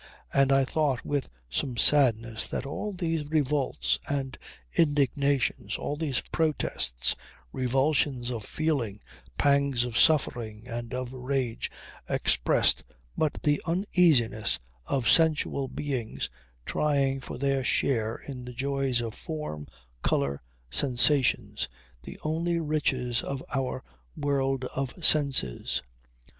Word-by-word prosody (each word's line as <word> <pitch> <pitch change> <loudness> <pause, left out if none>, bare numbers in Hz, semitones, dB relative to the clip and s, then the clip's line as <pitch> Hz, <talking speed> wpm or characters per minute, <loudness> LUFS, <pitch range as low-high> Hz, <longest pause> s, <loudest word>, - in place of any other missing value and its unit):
And 135 0 +4
I 135 0 +4
thought 140 -3 0
with 145 -3 -1 0.2
some 120 - -2
sadness 115 -6 +3
that - - -4
all 210 +9 -4
these 165 -4 -2
revolts 135 - +1
and 135 -2 -2 0.4
indignations, 140 -2 +1
all 145 - -3
these 145 -4 0
protests, 145 - +1 0.4
revulsions 130 -1 +1
of 115 -3 -4
feeling, 130 -8 -1 0.4
pangs 140 -3 +3
of 125 -1 -1
suffering 120 -7 +2
and 120 -1 -5
of 130 0 -4
rage, 130 -2 -2 0.4
expressed - - +3 0.3
but 155 -2 -1
the 145 -1 +2
uneasiness 165 - +3 0.3
of 130 -4 0
sensual 155 -3 +3
beings 130 -6 -3 0.3
trying 140 -3 +1
for 130 - -7
their 135 0 0
share 115 -3 +1
in 130 -3 -8
the 125 - -8
joys 135 -1 0
of 115 -2 -4
form, 150 - -6 0.3
colour, 70 0 0 0.3
sensations 130 - +3 0.3
the - - -10
only 170 +2 0
riches 130 -6 0
of 140 -1 -5
our 130 -1 -2 0.3
world 135 -2 0
of 135 +5 -3
senses. 135 - +4
135 Hz, 115 wpm, -28 LUFS, 120-145 Hz, 0.4 s, And